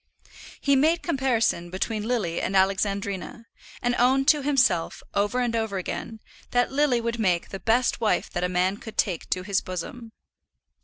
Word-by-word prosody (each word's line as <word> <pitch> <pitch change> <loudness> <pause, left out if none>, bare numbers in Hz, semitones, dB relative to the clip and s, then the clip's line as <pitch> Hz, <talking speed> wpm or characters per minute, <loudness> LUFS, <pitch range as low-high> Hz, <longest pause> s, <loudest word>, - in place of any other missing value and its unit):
He 280 -1 +3
made 320 +5 +3
comparison 245 - 0
between 210 +4 -3
Lily 210 -9 -1
and 195 - -2
Alexandrina, 195 +2 0 0.4
and 245 0 +2
owned 265 +2 +3
to 300 -2 +4
himself, 245 - +1
over 205 +5 +1
and 240 -2 0
over 220 -3 -1
again, 220 +4 -5 0.3
that 245 0 +1
Lily 270 -3 +2
would 235 0 -3
make 180 -5 +1
the 195 - -6
best 240 +3 +1
wife 220 - +1
that 175 - -2
a 180 - +1
man 180 +2 +1
could 220 0 -10
take 180 -6 0
to 185 - -1
his 195 0 0
bosom. 220 +6 -6
220 Hz, 165 wpm, -25 LUFS, 190-245 Hz, 0.4 s, to